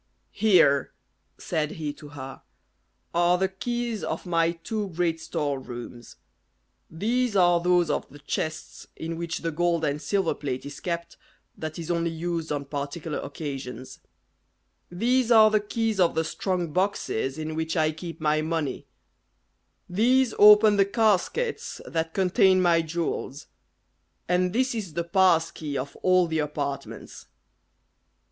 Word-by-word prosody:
"Here," 170 Hz, -10 st, +4 dB, 0.4 s
said 155 Hz, -1 st, -2 dB
he 150 Hz, -3 st, -4 dB
to 150 Hz, -, -13 dB
her, 135 Hz, -2 st, -9 dB, 0.7 s
"are 175 Hz, +1 st, +3 dB
the 190 Hz, +1 st, +1 dB
keys 235 Hz, +3 st, -3 dB
of -, -, -4 dB
my 165 Hz, -1 st, +1 dB
two 205 Hz, +5 st, -4 dB
great 170 Hz, -1 st, -1 dB
store 145 Hz, -3 st, -2 dB
rooms; 120 Hz, -2 st, -9 dB, 0.7 s
these 230 Hz, +6 st, 0 dB
are 175 Hz, -2 st, +4 dB
those 175 Hz, -1 st, +3 dB
of -, -, -2 dB
the 145 Hz, -, -13 dB
chests 155 Hz, +2 st, -5 dB
in 165 Hz, +1 st, -5 dB
which 170 Hz, 0 st, -4 dB
the 165 Hz, -, -1 dB
gold 170 Hz, 0 st, +1 dB
and 145 Hz, +1 st, -1 dB
silver 195 Hz, -3 st, 0 dB
plate 130 Hz, -3 st, -5 dB
is 145 Hz, 0 st, -8 dB
kept, 170 Hz, -1 st, -4 dB, 0.4 s
that 155 Hz, 0 st, -6 dB
is 170 Hz, 0 st, -4 dB
only 170 Hz, 0 st, 0 dB
used 165 Hz, 0 st, -3 dB
on 145 Hz, -1 st, -2 dB
particular 145 Hz, +2 st, -4 dB
occasions; 135 Hz, -4 st, -7 dB, 0.9 s
these 240 Hz, +7 st, +1 dB
are 220 Hz, -2 st, +7 dB
the 215 Hz, -, +4 dB
keys 220 Hz, 0 st, -2 dB
of 175 Hz, -2 st, +3 dB
the 160 Hz, -, +1 dB
strong 175 Hz, -3 st, -2 dB
boxes 180 Hz, -, -1 dB
in 155 Hz, 0 st, -4 dB
which 160 Hz, +2 st, -2 dB
I 155 Hz, -1 st, +3 dB
keep 165 Hz, +1 st, -8 dB
my 155 Hz, 0 st, +1 dB
money; 160 Hz, -2 st, -3 dB, 1.0 s
these 245 Hz, +7 st, +2 dB
open 210 Hz, 0 st, +8 dB
the 195 Hz, -, +5 dB
caskets 225 Hz, -, 0 dB
that 160 Hz, 0 st, -3 dB
contain 190 Hz, 0 st, +4 dB
my 170 Hz, -2 st, +4 dB
jewels; 160 Hz, -3 st, -4 dB, 0.8 s
and 180 Hz, +1 st, +2 dB
this 255 Hz, +4 st, +1 dB
is 195 Hz, -9 st, -5 dB
the 170 Hz, -, 0 dB
pass 170 Hz, -2 st, +3 dB
key 145 Hz, -3 st, -5 dB
of 135 Hz, +2 st, -5 dB
all 185 Hz, -1 st, +3 dB
the 160 Hz, -1 st, -2 dB
apartments. 145 Hz, -2 st, -5 dB
170 Hz, 145 wpm, -26 LUFS, 155-190 Hz, 1.0 s, open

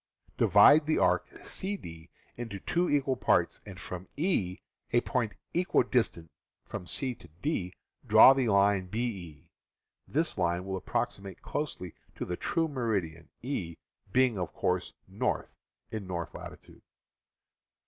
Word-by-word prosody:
Divide 145 Hz, +9 st, +6 dB
the 155 Hz, -, +2 dB
arc -, -, +2 dB, 0.2 s
CD 85 Hz, -, -4 dB, 0.3 s
into 115 Hz, -5 st, -6 dB
two 175 Hz, -, 0 dB
equal 140 Hz, -2 st, +2 dB
parts, -, -, +2 dB
and -, -, -9 dB
from 90 Hz, 0 st, -7 dB
E, 140 Hz, -, 0 dB, 0.3 s
a 120 Hz, -, +4 dB
point 120 Hz, -5 st, -1 dB, 0.2 s
equidistant 125 Hz, -, +1 dB, 0.3 s
from 90 Hz, -, -7 dB
C 130 Hz, +6 st, -2 dB
to 100 Hz, -, -16 dB, 0.2 s
D, 90 Hz, -, -1 dB, 0.3 s
draw 135 Hz, -, +9 dB
the 135 Hz, -3 st, 0 dB
line 100 Hz, -2 st, +3 dB
BE. 90 Hz, -, -5 dB, 0.6 s
This -, -, 0 dB
line 85 Hz, +2 st, 0 dB
will 95 Hz, 0 st, -3 dB
approximate 95 Hz, +1 st, -3 dB
closely 105 Hz, -, -4 dB, 0.2 s
to -, -, -4 dB
the 90 Hz, -, -3 dB
true 165 Hz, -, 0 dB
meridian, 100 Hz, -, -2 dB
E 95 Hz, -, -3 dB, 0.4 s
being, 125 Hz, -3 st, +3 dB
of 90 Hz, -, -3 dB
course, -, -, -1 dB
north, -, -, -2 dB, 0.4 s
in 110 Hz, -4 st, -5 dB
north 85 Hz, -3 st, -4 dB
latitude. -, -, -11 dB
105 Hz, 130 wpm, -30 LUFS, 90-130 Hz, 0.6 s, draw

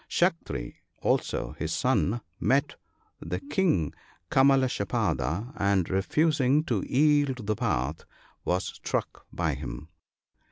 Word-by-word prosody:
Saktri 165 Hz, -, 0 dB, 0.3 s
also, -, -, 0 dB
his -, -, -2 dB
son, 115 Hz, +5 st, +1 dB, 0.2 s
met 135 Hz, +1 st, +2 dB, 0.5 s
the 90 Hz, -, -4 dB
King 145 Hz, -, +1 dB, 0.4 s
Kalmashapada, 130 Hz, -, +2 dB
and, 100 Hz, -3 st, +2 dB
refusing 145 Hz, -, +2 dB
to 170 Hz, -, 0 dB
yield 145 Hz, -4 st, +3 dB
the 110 Hz, +1 st, 0 dB
path, 65 Hz, -2 st, -1 dB, 0.4 s
was 90 Hz, +1 st, 0 dB
struck -, -, -4 dB
by -, -, 0 dB
him. 70 Hz, +7 st, -7 dB
125 Hz, 105 wpm, -28 LUFS, 90-145 Hz, 0.5 s, yield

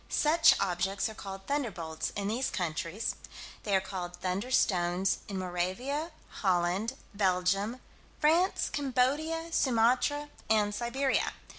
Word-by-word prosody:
Such 320 Hz, +2 st, +5 dB
objects 195 Hz, +1 st, 0 dB
are -, -, -7 dB
called 195 Hz, -2 st, -8 dB
"thunderbolts" 175 Hz, -, -2 dB
in 200 Hz, -1 st, -2 dB
these 235 Hz, +5 st, 0 dB
countries. 170 Hz, +3 st, -2 dB, 0.5 s
They 200 Hz, -2 st, 0 dB
are -, -, +5 dB
called 180 Hz, -2 st, -6 dB
"thunderstones" 185 Hz, -2 st, +1 dB
in 195 Hz, -, -4 dB
Moravia, 190 Hz, -, -2 dB, 0.3 s
Holland, 185 Hz, +4 st, +1 dB, 0.2 s
Belgium, 195 Hz, +4 st, +1 dB, 0.4 s
France, 330 Hz, +5 st, +3 dB
Cambodia, 295 Hz, +5 st, 0 dB
Sumatra, 260 Hz, +3 st, +2 dB, 0.2 s
and 210 Hz, -2 st, +3 dB
Siberia. 255 Hz, +5 st, 0 dB
205 Hz, 110 wpm, -30 LUFS, 185-265 Hz, 0.5 s, Such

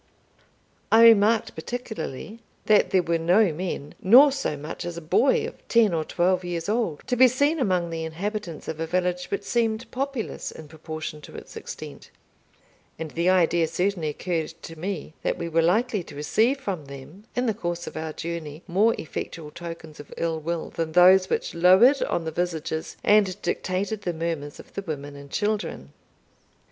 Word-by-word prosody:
I 225 Hz, +1 st, +7 dB
remarked 225 Hz, 0 st, +5 dB
particularly 220 Hz, -, -6 dB, 0.3 s
that 215 Hz, -1 st, +4 dB
there 185 Hz, -2 st, +3 dB
were 165 Hz, 0 st, 0 dB
no 180 Hz, +2 st, +3 dB
men, 165 Hz, -3 st, -5 dB
nor 260 Hz, +9 st, +8 dB
so 270 Hz, -, -2 dB
much 150 Hz, +3 st, -6 dB
as 175 Hz, -1 st, -5 dB
a -, -, -3 dB
boy 175 Hz, -, +2 dB
of -, -, -10 dB
ten 225 Hz, -5 st, +4 dB
or 160 Hz, -1 st, 0 dB
twelve 180 Hz, +3 st, +1 dB
years 175 Hz, -1 st, -4 dB
old, 215 Hz, -8 st, -1 dB
to 250 Hz, -, 0 dB
be 255 Hz, +1 st, +7 dB
seen 285 Hz, +6 st, +1 dB
among 180 Hz, -8 st, 0 dB
the 165 Hz, 0 st, -3 dB
inhabitants 175 Hz, +1 st, -5 dB
of 160 Hz, -, -5 dB
a 165 Hz, -, -2 dB
village 180 Hz, +1 st, 0 dB
which 200 Hz, +2 st, -3 dB
seemed 225 Hz, +1 st, 0 dB
populous 270 Hz, -3 st, -3 dB
in 160 Hz, -, -11 dB
proportion 155 Hz, 0 st, -7 dB
to -, -, -12 dB
its -, -, -10 dB
extent; -, -, -9 dB, 0.9 s
and 160 Hz, -1 st, -6 dB
the 170 Hz, +2 st, +1 dB
idea 170 Hz, -2 st, +3 dB
certainly 180 Hz, -2 st, -1 dB
occurred 160 Hz, +1 st, -3 dB
to 165 Hz, -, -8 dB
me, 175 Hz, -1 st, -5 dB
that -, -, -1 dB
we 170 Hz, -, -4 dB
were 165 Hz, 0 st, +2 dB
likely 210 Hz, +5 st, +2 dB
to -, -, -11 dB
receive 220 Hz, -, +1 dB
from 190 Hz, -, -4 dB
them, 140 Hz, +9 st, -11 dB
in 245 Hz, -, 0 dB
the 225 Hz, -, +1 dB
course 175 Hz, -4 st, -4 dB
of -, -, -8 dB
our 160 Hz, 0 st, -4 dB
journey, 160 Hz, -1 st, -6 dB
more 205 Hz, +6 st, +3 dB
effectual 155 Hz, 0 st, -6 dB
tokens 165 Hz, -2 st, -9 dB
of 145 Hz, -, -11 dB
ill 165 Hz, -1 st, -1 dB
will 165 Hz, +1 st, -4 dB
than 160 Hz, -1 st, -3 dB
those 185 Hz, +2 st, +6 dB
which -, -, -1 dB
lowered 190 Hz, +11 st, +6 dB
on 170 Hz, -, -1 dB
the 160 Hz, -, -2 dB
visages, 160 Hz, -2 st, -3 dB
and 205 Hz, -2 st, +3 dB
dictated 195 Hz, +3 st, -2 dB
the 180 Hz, -3 st, -2 dB
murmurs, 160 Hz, -3 st, -4 dB
of -, -, -14 dB
the -, -, -4 dB
women 145 Hz, -5 st, -6 dB
and 140 Hz, 0 st, -11 dB
children. 205 Hz, -, -2 dB
175 Hz, 180 wpm, -25 LUFS, 160-210 Hz, 0.9 s, nor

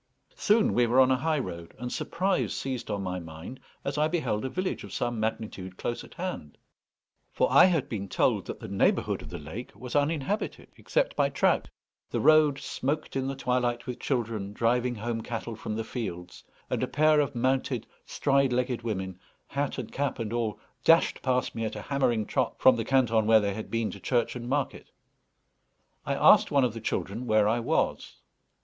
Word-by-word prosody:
Soon 215 Hz, -, +3 dB
we 120 Hz, -1 st, +3 dB
were 125 Hz, +3 st, +3 dB
on 130 Hz, 0 st, +6 dB
a -, -, +5 dB
high 155 Hz, +4 st, 0 dB
road, 85 Hz, -, -6 dB
and 125 Hz, +2 st, -5 dB
surprise 185 Hz, +2 st, -1 dB
seized 130 Hz, -4 st, -4 dB
on 100 Hz, -2 st, -2 dB
my 90 Hz, -1 st, -3 dB
mind 80 Hz, +9 st, -9 dB, 0.3 s
as 140 Hz, +1 st, -2 dB
I 155 Hz, -, +4 dB
beheld 135 Hz, -10 st, -1 dB
a 130 Hz, -, -2 dB
village 185 Hz, +6 st, -3 dB
of -, -, -9 dB
some 120 Hz, -2 st, -2 dB
magnitude 105 Hz, -4 st, -4 dB
close 120 Hz, -, -3 dB
at -, -, -14 dB
hand; 175 Hz, -, -5 dB, 0.7 s
for -, -, +1 dB
I -, -, +8 dB
had 170 Hz, -7 st, +2 dB
been 100 Hz, -4 st, -5 dB
told -, -, +1 dB
that -, -, -6 dB
the -, -, -7 dB
neighbourhood 100 Hz, 0 st, +1 dB
of -, -, -10 dB
the -, -, -6 dB
lake 80 Hz, +12 st, -8 dB
was 125 Hz, -1 st, -7 dB
uninhabited 150 Hz, +7 st, -1 dB
except -, -, 0 dB
by -, -, +2 dB
trout. -, -, +1 dB, 0.4 s
The -, -, -1 dB
road 155 Hz, -3 st, +5 dB
smoked 145 Hz, +2 st, -3 dB
in 135 Hz, 0 st, -1 dB
the 135 Hz, -, -3 dB
twilight 125 Hz, -2 st, 0 dB
with 125 Hz, -, -5 dB
children 110 Hz, -6 st, -2 dB
driving 120 Hz, +2 st, +1 dB
home 115 Hz, +1 st, -3 dB
cattle 115 Hz, 0 st, -5 dB
from 110 Hz, 0 st, -5 dB
the 115 Hz, -, -2 dB
fields; 90 Hz, -7 st, -6 dB, 0.2 s
and -, -, -2 dB
a -, -, 0 dB
pair 155 Hz, 0 st, +4 dB
of 145 Hz, -2 st, 0 dB
mounted 130 Hz, -1 st, 0 dB, 0.2 s
stride 140 Hz, -2 st, +1 dB
legged 125 Hz, -1 st, 0 dB
women, 95 Hz, -5 st, -4 dB, 0.3 s
hat 140 Hz, 0 st, -2 dB
and 125 Hz, -4 st, -5 dB
cap 140 Hz, 0 st, -1 dB
and 115 Hz, -2 st, -4 dB
all, 115 Hz, -3 st, -1 dB, 0.2 s
dashed 165 Hz, 0 st, +4 dB
past 125 Hz, -1 st, 0 dB
me 115 Hz, -, -3 dB
at 110 Hz, -, -3 dB
a 105 Hz, -, -5 dB
hammering 125 Hz, -6 st, +1 dB
trot 130 Hz, +2 st, -1 dB
from 130 Hz, -1 st, +6 dB
the 115 Hz, -2 st, -2 dB
canton 115 Hz, -5 st, +3 dB
where 110 Hz, 0 st, +7 dB
they 100 Hz, -1 st, -1 dB
had 110 Hz, +2 st, -6 dB
been 115 Hz, -1 st, -1 dB
to -, -, -9 dB
church 120 Hz, -2 st, 0 dB
and 120 Hz, 0 st, -6 dB
market. 140 Hz, 0 st, -2 dB, 1.2 s
I -, -, +1 dB
asked -, -, +6 dB
one 140 Hz, -2 st, +3 dB
of 120 Hz, -3 st, +1 dB
the 115 Hz, -, -7 dB
children 115 Hz, +3 st, -3 dB
where 110 Hz, -2 st, +4 dB
I 115 Hz, +3 st, +2 dB
was. 115 Hz, -, -1 dB
120 Hz, 195 wpm, -28 LUFS, 110-135 Hz, 1.2 s, I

